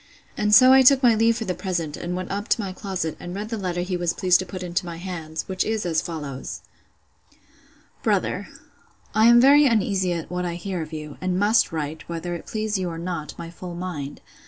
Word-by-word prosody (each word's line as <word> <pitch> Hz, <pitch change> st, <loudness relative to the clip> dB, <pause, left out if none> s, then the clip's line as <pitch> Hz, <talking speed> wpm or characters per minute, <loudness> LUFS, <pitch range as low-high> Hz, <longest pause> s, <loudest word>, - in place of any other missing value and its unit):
And 210 Hz, 0 st, 0 dB
so 255 Hz, +3 st, +8 dB
I 265 Hz, -, +8 dB
took 265 Hz, +1 st, +6 dB
my 240 Hz, -2 st, +6 dB
leave 225 Hz, +1 st, +3 dB
for 225 Hz, -, -4 dB
the 185 Hz, -, -1 dB
present, 175 Hz, -4 st, -3 dB
and 175 Hz, +1 st, -4 dB
went 185 Hz, 0 st, -5 dB
up 205 Hz, +3 st, -3 dB
to -, -, +2 dB
my 195 Hz, -3 st, -3 dB
closet, 185 Hz, -5 st, -3 dB
and 175 Hz, +1 st, -7 dB
read 210 Hz, +2 st, -5 dB
the 230 Hz, -, -3 dB
letter 180 Hz, -2 st, -2 dB
he 180 Hz, +1 st, -2 dB
was 175 Hz, -1 st, 0 dB
pleased 180 Hz, -1 st, +3 dB
to 185 Hz, -, -4 dB
put 185 Hz, 0 st, -6 dB
into 175 Hz, 0 st, -2 dB
my 170 Hz, -2 st, -7 dB
hands; 165 Hz, -3 st, -6 dB
which 190 Hz, -1 st, -1 dB
is 220 Hz, -2 st, -2 dB
as 165 Hz, -2 st, +1 dB
follows:— 150 Hz, -6 st, -6 dB, 1.4 s
'BROTHER, -, -, 0 dB, 0.7 s
'I 215 Hz, +2 st, +4 dB
am 235 Hz, 0 st, +8 dB
very 285 Hz, +3 st, +7 dB
uneasy 200 Hz, -5 st, +1 dB
at 165 Hz, -1 st, -5 dB
what 180 Hz, 0 st, -2 dB
I 175 Hz, -1 st, -3 dB
hear 180 Hz, 0 st, -4 dB
of 155 Hz, 0 st, -7 dB
you; 150 Hz, -2 st, -7 dB
and 185 Hz, -1 st, -1 dB
must 205 Hz, +2 st, +3 dB
write, 155 Hz, 0 st, -5 dB
whether 170 Hz, +1 st, -4 dB
it 170 Hz, -, -7 dB
please 215 Hz, -2 st, -2 dB
you 180 Hz, -1 st, -2 dB
or 165 Hz, -, -6 dB
not, 170 Hz, -3 st, -5 dB
my 170 Hz, 0 st, -7 dB
full 175 Hz, 0 st, -8 dB
mind. 170 Hz, -6 st, -6 dB
180 Hz, 225 wpm, -24 LUFS, 170-210 Hz, 1.4 s, so